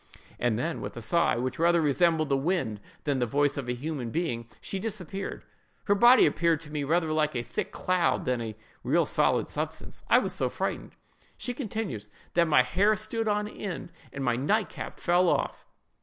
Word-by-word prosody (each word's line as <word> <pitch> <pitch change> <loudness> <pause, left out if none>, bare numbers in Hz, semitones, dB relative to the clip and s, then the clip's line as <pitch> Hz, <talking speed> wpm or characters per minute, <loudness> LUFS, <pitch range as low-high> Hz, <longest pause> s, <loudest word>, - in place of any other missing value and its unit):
and 120 -3 +1
then 160 +7 -2
with - - -6
a - - -3
sigh, 170 +8 +2
which 125 +3 -3
rather 170 +1 +4
resembled 160 +1 +2
the 140 - +2
wind 135 - -1 0.2
than 140 -3 0
the 125 - +2
voice 145 +3 +2
of 135 -4 -4
a - - +1
human 135 -1 -4
being, 120 -6 -2
she 195 - -4
disappeared. 195 -2 -5 0.4
Her 200 - +3
body 240 +5 +7
appeared 165 +1 +2
to 150 -2 -12
me 150 -1 -2
rather 160 +2 +1
like 155 -2 +1
a 120 - -1
thick 120 - -4
cloud 185 -1 +1
than 125 -2 0
a 110 -2 -5 0.3
real - - +3
solid - - +2
substance. - - -5
I - - +7
was - - 0
so - - 0
frightened," - - -4 0.4
she 245 - -4
continues, 215 - -4 0.2
"that 170 -1 +3
my 150 -5 +5
hair 200 +12 +3
stood 225 +1 -2
on 210 0 +1
end, 195 -4 -6 0.2
and 135 - -5
my 120 -2 +2
night 200 - +1
cap - - -8
fell 175 0 +3
off. - - -1
160 Hz, 195 wpm, -28 LUFS, 130-185 Hz, 0.4 s, body